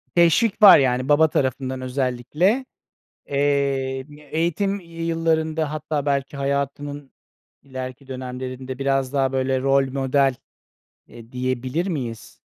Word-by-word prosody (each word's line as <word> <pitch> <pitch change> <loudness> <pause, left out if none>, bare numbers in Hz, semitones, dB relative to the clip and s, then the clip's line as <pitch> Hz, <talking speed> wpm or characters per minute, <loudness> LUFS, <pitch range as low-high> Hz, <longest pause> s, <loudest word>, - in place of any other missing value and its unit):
Teşvik 175 +6 +3
var 205 -6 +10
yani 130 0 +1
baba 155 +2 +5
tarafından 130 -1 -1
özellikle, 135 - 0 0.6
eee, 140 -2 0 0.3
eğitim 175 +5 0
yıllarında 165 -2 -1
hatta 150 -1 -3
belki 140 0 -1
hayatının 140 0 -3 0.5
ileriki 130 0 -7
dönemlerinde 130 0 -6
biraz 135 -1 0
daha 135 -2 +1
böyle 130 0 0
rol 135 0 +2
model, 135 0 +1 0.7
eee, 115 0 -14
diyebilir 130 +7 -2
miyiz? 125 - -5
140 Hz, 105 wpm, -22 LUFS, 130-155 Hz, 0.7 s, var